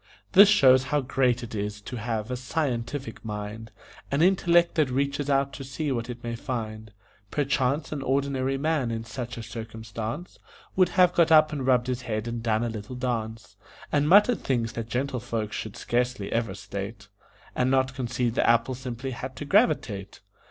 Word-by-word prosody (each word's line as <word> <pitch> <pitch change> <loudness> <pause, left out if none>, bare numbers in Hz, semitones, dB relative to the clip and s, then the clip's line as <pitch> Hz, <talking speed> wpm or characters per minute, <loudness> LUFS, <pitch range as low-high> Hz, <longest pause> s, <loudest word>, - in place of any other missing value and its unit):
This 200 +1 +8
shows 130 -9 +6
how 150 +2 +1
great 125 -2 +1
it 120 - -8
is 105 0 -3
to 125 +4 -7
have 115 0 -3
a - - -1
scientific 125 -2 -3
mind 105 +1 -6 0.4
An 140 +3 +2
intellect 175 -2 +4
that 155 -4 +2
reaches 140 +2 -1
out 140 0 +2
to 135 - -7
see 135 +3 -3
what 120 -2 -2
it 120 0 -7
may 120 0 -3
find. 110 -3 -5 0.4
Perchance 140 0 0
an 150 -2 -3
ordinary 135 0 0
man 150 -3 0
in 115 -1 -3
such 120 +1 -6
a 115 - -6
circumstance 110 - -6 0.4
Would 185 -1 +4
have 180 -1 +6
got 165 -2 +3
up 155 -1 +6
and 135 -3 -3
rubbed 125 -2 +4
his 125 -1 -2
head 110 -2 -3
and 115 0 -3
done 110 -1 +1
a 120 - -1
little 110 +2 -7
dance, 115 -3 -4 0.3
And 145 0 +2
muttered 210 +6 +6
things 115 -4 0
that 115 0 -5
gentle 130 +2 -1
folks 115 -3 -3
should 110 +1 -5
scarcely 120 -4 -1
ever 115 -4 -1
state, 100 +1 -7 0.5
And 125 0 +2
not 130 0 +2
concede 125 -2 -1
the - - +2
apple 115 +2 +3
simply 130 +1 -5
had 130 +2 -6
to 145 - -6
gravitate. 125 - +1
125 Hz, 180 wpm, -26 LUFS, 115-140 Hz, 0.5 s, This